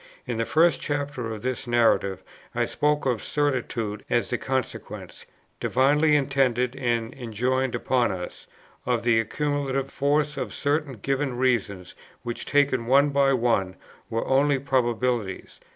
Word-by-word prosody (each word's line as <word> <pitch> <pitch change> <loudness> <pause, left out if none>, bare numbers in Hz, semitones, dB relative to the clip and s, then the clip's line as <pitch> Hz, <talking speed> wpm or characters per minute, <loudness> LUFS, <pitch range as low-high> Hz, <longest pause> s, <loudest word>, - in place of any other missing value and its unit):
In 120 -2 -3
the 115 - 0
first 165 -2 +3
chapter 145 -5 -3
of 110 -1 -7
this 130 +1 -3
Narrative 110 -5 +2 0.3
I - - +2
spoke 150 0 0
of 125 -4 0
certitude 120 -7 -2
as 120 - +1
the 125 - 0
consequence, 130 -2 -4 0.3
divinely 150 +4 +3
intended 130 -3 +1
and 120 -3 -1
enjoined 130 +2 -1
upon 125 -4 +1
us, 90 -2 -7 0.4
of 120 -2 +1
the 115 -1 +4
accumulative 135 +2 -1
force 150 +1 +1
of - - -4
certain 145 -1 0
given 135 +2 -2
reasons 110 -8 0 0.3
which, 120 -1 -5
taken 140 -5 +2
one 140 +3 +5
by 140 -1 +3
one, 115 -7 +1 0.3
were 115 -1 -2
only 140 +1 +3
probabilities. 125 -6 -1
130 Hz, 135 wpm, -25 LUFS, 115-140 Hz, 0.4 s, one